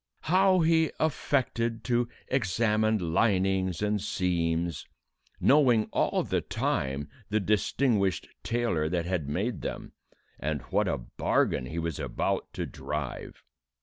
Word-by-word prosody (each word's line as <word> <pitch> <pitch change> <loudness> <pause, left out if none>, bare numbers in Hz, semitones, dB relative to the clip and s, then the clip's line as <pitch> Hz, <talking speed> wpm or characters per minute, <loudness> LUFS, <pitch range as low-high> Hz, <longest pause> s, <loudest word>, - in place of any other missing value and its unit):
how 185 +1 +4
he 160 -1 +3
affected 120 -6 0
to 120 -1 +1 0.2
examine 110 -5 +1
linings 95 -2 +2
and 105 -1 +1
seams, 85 -4 -1 0.5
knowing 125 -7 +5
all - - +1
the - - 0
time 70 +2 -2 0.2
the 110 +1 +2
distinguished 105 0 +1
tailor 115 -10 0
that 85 -1 -1
had 85 -6 -2
made 100 +11 -2
them, - - -5 0.5
and 75 0 -2
what - - +2
a - - 0
bargain 65 +1 0
he 80 - -6
was 85 -3 -2
about - - -2
to - - -3
drive. 75 -5 -5
100 Hz, 120 wpm, -28 LUFS, 85-120 Hz, 0.5 s, knowing